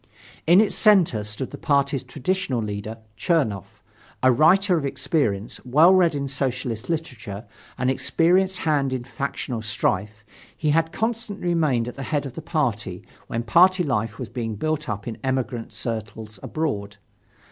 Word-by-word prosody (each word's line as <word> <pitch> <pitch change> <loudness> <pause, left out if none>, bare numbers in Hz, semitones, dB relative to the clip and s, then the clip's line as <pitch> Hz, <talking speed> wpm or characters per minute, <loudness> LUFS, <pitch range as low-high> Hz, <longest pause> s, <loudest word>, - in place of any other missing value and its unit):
In 175 +3 +7
its 215 - +1
center 180 - +4
stood 105 +5 -5
the - - -8
party's 140 -2 +1
traditional 140 +2 -2
leader, 105 +1 -4 0.2
Chernoff. 110 - -1 0.4
A 130 - +6
writer 180 - +4
of 160 - -1
experience, 130 -6 -1
well 155 +9 +6
read 175 -4 +4
in 140 -1 -2
socialist 130 -3 -3
literature, 120 -10 -4 0.3
an 125 0 0
experienced 180 +8 +2
hand 145 -5 +1
in 130 -2 -3
factional 125 -1 -4
strife, 105 0 -1 0.3
he 155 -2 +1
had 160 +1 +2
constantly 225 -5 -2
remained 150 -9 +1
at 125 - -7
the - - -5
head 145 -2 0
of 135 - -6
the 160 - -7
party, 115 - -2 0.2
when 115 +1 -2
party 180 - +5
life 115 -6 -1
was 125 - -5
being 115 -2 -4
built 155 +5 -2
up 105 +1 -4
in 115 - -5
emigrant 130 -3 -2
circles 110 -2 -6
abroad. 105 -11 -3
130 Hz, 155 wpm, -24 LUFS, 115-160 Hz, 0.4 s, In